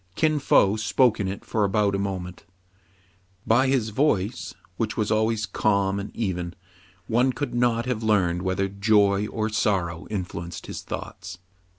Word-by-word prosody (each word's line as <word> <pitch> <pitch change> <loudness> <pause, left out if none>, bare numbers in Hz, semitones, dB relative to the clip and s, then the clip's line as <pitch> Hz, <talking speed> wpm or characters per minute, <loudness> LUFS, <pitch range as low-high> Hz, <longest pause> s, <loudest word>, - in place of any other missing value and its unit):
Kin 155 -1 +2
Fo 105 -6 +4
spoke 110 +3 +2
in 100 - -1
it 95 +1 -6
for 110 - 0
about 100 0 +2
a 100 - 0
moment. 95 -2 -4 1.0
By 125 +4 +4
his 130 -5 +1
voice, 110 -3 0 0.2
which 110 +2 -2
was 110 -1 0
always 110 0 +1
calm 100 -1 +1
and 100 - -5
even, 90 -5 -3 0.5
one 125 +3 +2
could 135 +2 -4
not 120 -1 +1
have 125 -3 -2
learned 90 -6 +2
whether 95 +1 0
joy 100 0 +2
or 110 0 -2
sorrow 90 -6 -1
influenced 90 -4 -5
his - - -6
thoughts. 90 -1 -7
105 Hz, 155 wpm, -25 LUFS, 95-115 Hz, 1.0 s, Fo